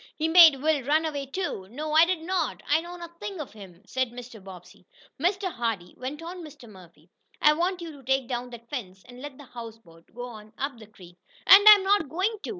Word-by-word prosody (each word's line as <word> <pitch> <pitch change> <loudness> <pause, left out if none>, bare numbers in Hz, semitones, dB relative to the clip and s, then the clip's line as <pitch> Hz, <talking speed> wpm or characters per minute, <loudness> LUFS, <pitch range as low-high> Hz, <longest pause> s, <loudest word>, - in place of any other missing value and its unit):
He 315 - -1
made 325 -3 +8
Will 305 0 +1
run 300 +5 +1
away 285 -3 -4
too." 275 - -4
"No, 300 +6 -5
I 320 +2 +7
did 355 -2 -2
not. 355 -2 -2
I 305 +2 +3
know 345 +1 -9
nothing 340 +2 -8
of 290 -8 -7
him," 195 -3 -14
said 260 +2 -2
Mr. 240 -3 -11
Bobbsey. 185 0 -14 0.3
"Mr. 375 +2 0
Hardee," 225 -7 -3
went 280 +5 -7
on 355 +2 -8
Mr. 290 -6 -13
Murphy. 185 -5 -17 0.3
"I 300 - +5
want 350 +3 -1
you 330 - -7
to 285 -2 -14
take 265 0 0
down 245 0 -4
that 235 -1 -12
fence, 195 -8 -7
and 250 0 -13
let 290 -2 -9
the 290 - -12
houseboat 225 -9 -12
go 245 0 -6
on 215 -2 -12
up 275 -3 -4
the 220 - -13
creek." 180 -4 -17 0.3
"And 405 +2 +8
I'm 415 -2 +8
not 385 -6 +2
going 380 +8 -1
to!" - - -6
270 Hz, 220 wpm, -26 LUFS, 225-330 Hz, 0.3 s, made